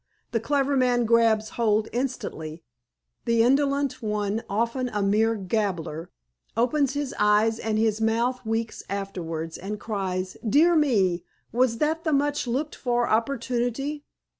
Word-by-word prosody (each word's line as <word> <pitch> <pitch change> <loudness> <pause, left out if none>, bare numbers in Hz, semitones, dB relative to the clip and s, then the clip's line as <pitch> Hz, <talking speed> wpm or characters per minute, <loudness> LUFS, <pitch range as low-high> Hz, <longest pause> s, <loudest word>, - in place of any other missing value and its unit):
The 230 - +1
clever 280 +4 +1
man 245 -2 +3
grabs 225 -1 +3
hold 215 -2 +1
instantly. 170 - -4 0.6
The 230 -1 +3
indolent 275 +2 +2
one, 210 0 -1
often 235 +5 0
a 210 -3 -1
mere 220 +3 +2
gabbler, 180 -6 -2 0.5
opens 270 +3 +2
his 285 -2 -2
eyes 210 +2 +3
and 220 -1 -1
his 220 0 +1
mouth 235 +3 +1
weeks 225 0 -2
afterwards, 170 -5 -4
and 205 +3 -5
cries, 190 -3 -3
'Dear 305 +10 +4
me! 200 - +2 0.3
Was 240 0 +2
that 315 +5 0
the 315 - +1
much 290 -1 +1
looked 275 +6 -1
for 240 -2 0
opportunity? 245 +4 -1
230 Hz, 135 wpm, -25 LUFS, 210-260 Hz, 0.6 s, Dear